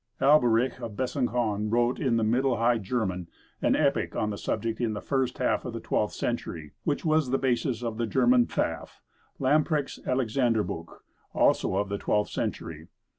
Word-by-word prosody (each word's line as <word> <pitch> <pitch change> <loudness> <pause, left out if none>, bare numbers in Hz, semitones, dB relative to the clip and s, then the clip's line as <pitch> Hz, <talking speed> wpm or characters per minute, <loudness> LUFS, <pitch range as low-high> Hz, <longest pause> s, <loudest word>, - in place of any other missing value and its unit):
Alberich 130 -3 +4
of 115 - -5
Besançon 120 -5 -1
wrote 120 +1 +2
in 130 -7 +1
Middle 120 +3 +2
High 115 +1 +2
German 95 -5 -2 0.3
an - - +3
epic - - +1
on 105 - 0
the - - -3
subject 115 +2 -2
in 115 -2 0
the 105 - -4
first 135 0 -1
half - - 0
of - - -5
the - - -4
twelfth - - -1
century, 75 -3 -4
which 150 0 -1
was 155 -4 +2
the 135 - +2
basis 125 -2 0
of 115 -1 -3
the 115 - 0
German 125 +2 +4
"Pfaffe" - - -3 0.4
Lamprecht's 145 +1 +1
"Alexanderbuch," 115 -8 0 0.5
also - - +3
of 100 +1 0
the 100 0 -3
twelfth 105 0 0
century. 80 0 -4
120 Hz, 165 wpm, -27 LUFS, 105-130 Hz, 0.5 s, Alberich